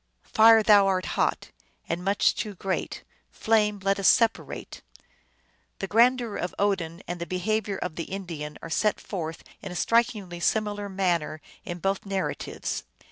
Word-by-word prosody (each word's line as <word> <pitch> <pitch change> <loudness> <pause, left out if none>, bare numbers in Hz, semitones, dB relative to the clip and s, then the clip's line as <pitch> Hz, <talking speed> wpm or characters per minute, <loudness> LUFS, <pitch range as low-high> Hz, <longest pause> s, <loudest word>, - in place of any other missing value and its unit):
"Fire, 225 0 +7
thou 205 -2 +6
art 185 -1 +1
hot, - - -1 0.4
and 170 +2 -3
much 200 +2 +3
too 210 -2 -4
great; 190 +1 -3 0.3
flame, 210 -2 +1
let 195 0 +1
us 195 - +3
separate." 230 -2 +1 1.0
The - - -3
grandeur 235 +2 +3
of 180 - -4
Odin 190 -4 -1
and 175 0 -5
the 170 - -4
behavior 200 +2 -1
of 180 -3 -5
the 165 - -5
In 195 0 -4
dian 150 -3 -6
are 165 - -6
set 210 +5 +1
forth 165 -5 -5 0.2
in 195 - -7
a - - -7
strikingly 210 -5 +1
similar 205 +1 0
manner 175 -5 -1 0.3
in 175 - -5
both 195 +2 -1
narratives. 195 -1 -3
195 Hz, 155 wpm, -26 LUFS, 175-210 Hz, 1.0 s, Fire